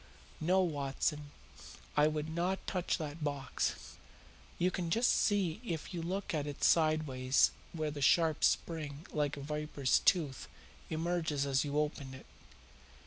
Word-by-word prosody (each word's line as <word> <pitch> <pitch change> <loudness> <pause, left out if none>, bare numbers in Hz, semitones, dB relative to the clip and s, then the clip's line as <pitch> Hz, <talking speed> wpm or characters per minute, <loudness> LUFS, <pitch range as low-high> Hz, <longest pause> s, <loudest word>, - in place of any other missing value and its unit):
No, 185 +4 +3
Watson, 145 -2 -1 0.7
I 150 0 +5
would 155 0 -2
not 175 +4 -2
touch 180 -3 -1
that 155 0 -5
box. 140 -3 -3 0.6
You 180 +2 +2
can 175 -3 -3
just 230 +8 +3
see 200 -3 +1
if 170 -4 -4
you 170 - -3
look 185 +4 -3
at 150 -2 -1
it 145 - -6
sideways 155 -5 +3 0.2
where 155 -2 -2
the 145 -1 -6
sharp 160 +3 +3
spring 155 -2 0
like 145 -1 -1
a - - -6
viper's 150 -2 0
tooth 150 -9 +1 0.4
emerges 160 -3 -1
as 135 -1 +2
you 145 0 -2
open 145 -3 -2
it. 130 - -12
155 Hz, 140 wpm, -33 LUFS, 145-170 Hz, 0.7 s, I